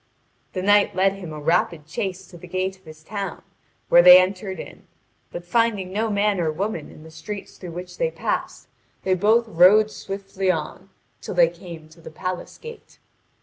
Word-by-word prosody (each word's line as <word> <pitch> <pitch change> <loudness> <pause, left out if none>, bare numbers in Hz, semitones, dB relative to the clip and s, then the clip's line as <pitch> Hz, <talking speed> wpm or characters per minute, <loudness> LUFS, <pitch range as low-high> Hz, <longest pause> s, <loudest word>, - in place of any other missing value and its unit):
The 185 - -3
knight 205 +1 +4
led 190 +1 +3
him 185 -5 -9
a 155 - -7
rapid 160 0 0
chase 185 +4 -4
to 180 - -14
the 180 - -11
gate 185 +2 -2
of 190 -1 -28
his 155 0 -13
town, 195 -1 -6 0.4
where 175 - +7
they 180 +1 +10
entered 190 0 -2
in; - - -11 0.4
but 175 - -7
finding 205 -2 0
no 220 +2 0
man 205 -1 +1
or 160 -2 0
woman 185 -1 -4
in 155 - -14
the 160 - -13
streets 195 +6 -8
through 175 -3 -8
which 180 - -9
they - - +1
passed, - - -4 0.4
they 190 - +1
both 220 +5 +3
rode 210 +4 +5
swiftly 195 -1 -4
on 180 +3 -3 0.3
till - - -6
they 170 -2 +5
came 170 -2 -11
to 165 +1 -18
the - - -10
palace 185 +3 -6
gate. 465 0 -12
185 Hz, 190 wpm, -23 LUFS, 170-200 Hz, 0.4 s, they